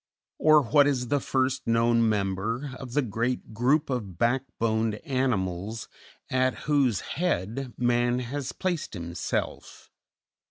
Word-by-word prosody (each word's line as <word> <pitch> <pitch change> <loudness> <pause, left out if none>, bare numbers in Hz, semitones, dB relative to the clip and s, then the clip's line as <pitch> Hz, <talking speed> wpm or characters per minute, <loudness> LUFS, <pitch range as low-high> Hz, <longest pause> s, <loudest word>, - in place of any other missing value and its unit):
or, 155 -1 +6
What 140 +5 +4
is 125 -4 0
the 145 - +2
first 130 -1 -1
known 115 0 +3
member 105 +6 -1
of 125 -3 -8
the 145 - +2
great 115 +1 -2
group 135 +7 +2
of 105 -9 -3
backboned 115 -2 0
animals 110 -6 -1 0.4
at 130 0 +1
whose 135 -8 +2
head 135 - -2
man 120 0 +2
has 130 +2 -4
placed 175 - -3
himself? 85 -1 -4
120 Hz, 120 wpm, -27 LUFS, 110-135 Hz, 0.4 s, or